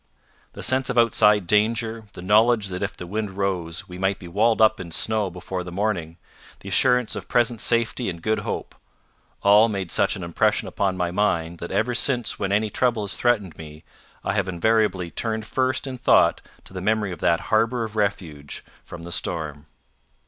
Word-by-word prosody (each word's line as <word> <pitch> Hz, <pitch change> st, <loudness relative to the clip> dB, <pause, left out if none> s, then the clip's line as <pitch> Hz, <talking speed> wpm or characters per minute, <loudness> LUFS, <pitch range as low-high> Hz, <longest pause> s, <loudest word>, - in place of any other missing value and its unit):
The -, -, -8 dB
sense 130 Hz, 0 st, +1 dB
of -, -, -2 dB
outside 105 Hz, -4 st, +4 dB
danger; 110 Hz, +3 st, +1 dB
the 90 Hz, -, -9 dB
knowledge 110 Hz, +1 st, +3 dB
that 90 Hz, 0 st, -5 dB
if 100 Hz, +1 st, -3 dB
the 90 Hz, -, -7 dB
wind 105 Hz, +3 st, -3 dB
rose, 90 Hz, -4 st, -2 dB
we 90 Hz, 0 st, -9 dB
might 95 Hz, +1 st, 0 dB
be 90 Hz, -, -11 dB
walled 110 Hz, +6 st, +2 dB
up 110 Hz, 0 st, +4 dB
in 90 Hz, -2 st, -7 dB
snow 105 Hz, +4 st, +1 dB
before 90 Hz, +1 st, -5 dB
the 90 Hz, -, -8 dB
morning; 90 Hz, -4 st, -2 dB, 0.4 s
the 100 Hz, -, -8 dB
assurance 125 Hz, +3 st, +3 dB
of -, -, -7 dB
present 120 Hz, -2 st, +1 dB
safety 115 Hz, 0 st, 0 dB
and 85 Hz, -2 st, -6 dB
good 110 Hz, +5 st, 0 dB
hope -, -, -5 dB, 0.7 s
all 105 Hz, +3 st, +6 dB
made 95 Hz, -4 st, -4 dB
such -, -, +2 dB
an -, -, -7 dB
impression 85 Hz, -1 st, 0 dB
upon 95 Hz, -2 st, -1 dB
my 90 Hz, -1 st, -1 dB
mind 85 Hz, -4 st, 0 dB
that 85 Hz, -, -6 dB
ever 110 Hz, +6 st, 0 dB
since 125 Hz, -1 st, 0 dB
when 100 Hz, -1 st, -2 dB
any 105 Hz, +1 st, +1 dB
trouble 120 Hz, -2 st, +1 dB
has 100 Hz, -, -2 dB
threatened 105 Hz, -9 st, 0 dB
me, 75 Hz, -1 st, -10 dB, 0.4 s
I -, -, -1 dB
have 100 Hz, -3 st, 0 dB
invariably 95 Hz, -1 st, +1 dB
turned 110 Hz, -1 st, -2 dB
first 130 Hz, +3 st, 0 dB
in 130 Hz, -2 st, -6 dB
thought -, -, +4 dB, 0.2 s
to -, -, -14 dB
the 95 Hz, -, -5 dB
memory 105 Hz, 0 st, 0 dB
of 90 Hz, -, -7 dB
that 85 Hz, -, +2 dB
harbour 115 Hz, +2 st, +2 dB
of 110 Hz, -1 st, -6 dB
refuge 85 Hz, -9 st, -3 dB, 0.2 s
from 85 Hz, -1 st, -10 dB
the 85 Hz, -, -8 dB
storm. 75 Hz, -3 st, -3 dB
105 Hz, 190 wpm, -23 LUFS, 90-110 Hz, 0.7 s, all